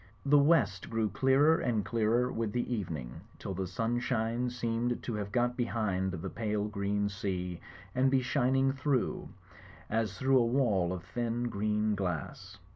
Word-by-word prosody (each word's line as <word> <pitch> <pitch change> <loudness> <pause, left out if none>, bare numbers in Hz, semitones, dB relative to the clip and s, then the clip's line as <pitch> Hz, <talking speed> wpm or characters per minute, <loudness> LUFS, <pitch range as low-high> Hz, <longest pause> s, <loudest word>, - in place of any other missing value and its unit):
The 145 +1 +6
west 140 - +3
grew 110 -1 0
clearer 135 - +4
and 110 -5 0
clearer 115 +4 +1
with 110 -2 -2
the 125 0 -1
evening, 80 - -4 0.2
till 95 - -5
the 95 0 -3
sunshine 115 +3 -1
seemed 120 0 -2
to 120 - -3
have 105 -1 -4
got 120 +1 +1
behind 105 -6 -1
the 85 -3 -5
pale 105 -2 -1
green 100 -1 -1
sea 90 -3 -3 0.3
and 130 +1 +3
be 130 -1 +2
shining 135 0 +2
through, 135 -2 -1 0.6
as 110 -3 0
through 130 +2 +4
a - - +4
wall 110 -9 +2
of 90 -2 -4
thin 120 +4 -2
green 105 0 0
glass. 95 +1 -4
115 Hz, 155 wpm, -31 LUFS, 100-125 Hz, 0.6 s, The